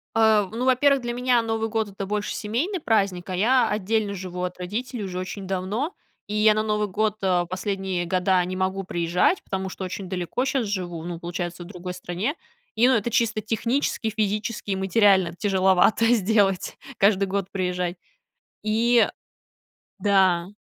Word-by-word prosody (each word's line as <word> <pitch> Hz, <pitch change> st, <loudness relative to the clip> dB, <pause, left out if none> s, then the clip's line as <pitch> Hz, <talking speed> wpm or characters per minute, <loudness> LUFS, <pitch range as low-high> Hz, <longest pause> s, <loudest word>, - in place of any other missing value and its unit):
Э, 220 Hz, -2 st, +4 dB
ну, 235 Hz, +3 st, -2 dB
во-первых, 270 Hz, +1 st, +4 dB
для 240 Hz, 0 st, -3 dB
меня 245 Hz, -1 st, +2 dB
Новый 225 Hz, 0 st, -2 dB
год- 220 Hz, -1 st, -1 dB
это 195 Hz, 0 st, -6 dB
больше 210 Hz, +1 st, -2 dB
семейный 270 Hz, -, -2 dB
праздник, 195 Hz, -, 0 dB
а, 185 Hz, -, -2 dB
я 235 Hz, +4 st, +3 dB
отдельно 210 Hz, 0 st, 0 dB
живу 180 Hz, -1 st, -5 dB
от 180 Hz, 0 st, -4 dB
родителей 215 Hz, +5 st, -4 dB
уже 185 Hz, -1 st, -4 dB
очень 190 Hz, +1 st, -6 dB
давно, 195 Hz, -, -2 dB, 0.3 s
и 210 Hz, -, -4 dB
я 215 Hz, 0 st, +5 dB
на 215 Hz, 0 st, 0 dB
Новый 210 Hz, -1 st, 0 dB
год, 215 Hz, +2 st, 0 dB
э, 180 Hz, -2 st, +2 dB
последние 190 Hz, -1 st, -2 dB
года 185 Hz, +1 st, +2 dB
не 185 Hz, +1 st, -4 dB
могу 190 Hz, +1 st, -1 dB
приезжать, 175 Hz, -, +1 dB
потому 190 Hz, 0 st, -3 dB
что 190 Hz, -, -7 dB
очень 185 Hz, 0 st, -6 dB
далеко 185 Hz, +7 st, -2 dB
щас 265 Hz, -3 st, 0 dB
живу, 180 Hz, -5 st, -4 dB
ну, 170 Hz, -1 st, -5 dB
получается 175 Hz, 0 st, -5 dB
в -, -, -12 dB
другой 180 Hz, -2 st, -7 dB
стране. 185 Hz, -, -3 dB, 0.4 s
И 235 Hz, +3 st, +5 dB
ну, 260 Hz, -, +5 dB
это 230 Hz, +2 st, 0 dB
чисто 225 Hz, -1 st, +1 dB
технически, 230 Hz, +2 st, -1 dB
физически 210 Hz, 0 st, -2 dB
и -, -, +1 dB
материально 190 Hz, -2 st, +3 dB
тяжеловато 190 Hz, +2 st, +3 dB
сделать, 200 Hz, -3 st, +1 dB, 0.2 s
каждый 200 Hz, 0 st, +4 dB
год 195 Hz, -1 st, -2 dB
приезжать. 180 Hz, -2 st, -2 dB, 0.7 s
И 230 Hz, +2 st, +3 dB, 0.9 s
Да. 190 Hz, -4 st, +3 dB
200 Hz, 165 wpm, -24 LUFS, 185-225 Hz, 0.9 s, я